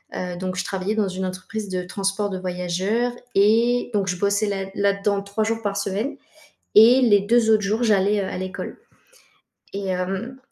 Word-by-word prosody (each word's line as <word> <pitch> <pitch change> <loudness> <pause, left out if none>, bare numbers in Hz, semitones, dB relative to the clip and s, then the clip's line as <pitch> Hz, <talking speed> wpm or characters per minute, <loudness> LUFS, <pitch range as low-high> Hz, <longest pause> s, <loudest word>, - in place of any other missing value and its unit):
heu, 180 -1 -4
donc 185 0 -4
je 190 - -1
travaillais 195 +2 -2
dans 210 -3 +1
une 190 0 -3
entreprise 190 +3 -5
de 180 -1 -2
transport 195 +2 -2
de 190 - -4
voyageurs 185 +6 -1 0.2
et 230 +5 +3
donc 200 -2 0
je 180 -2 -1
bossais 200 +2 +1
là 195 -1 -2
là-dedans 200 0 +1
3 200 +2 -2
jours 225 +1 -1
par 200 -1 -1
semaine 200 +7 -2 0.6
et 235 +5 +8
les 205 -5 +5
2 225 +2 +3
autres 215 -1 +4
jours, 210 +4 0
j'allais, 205 -1 +3
heu, - - -2
à - - -5
l'école 185 +1 -6 1.0
et 200 0 -4
hem 190 +8 -3
200 Hz, 185 wpm, -23 LUFS, 190-220 Hz, 1.0 s, et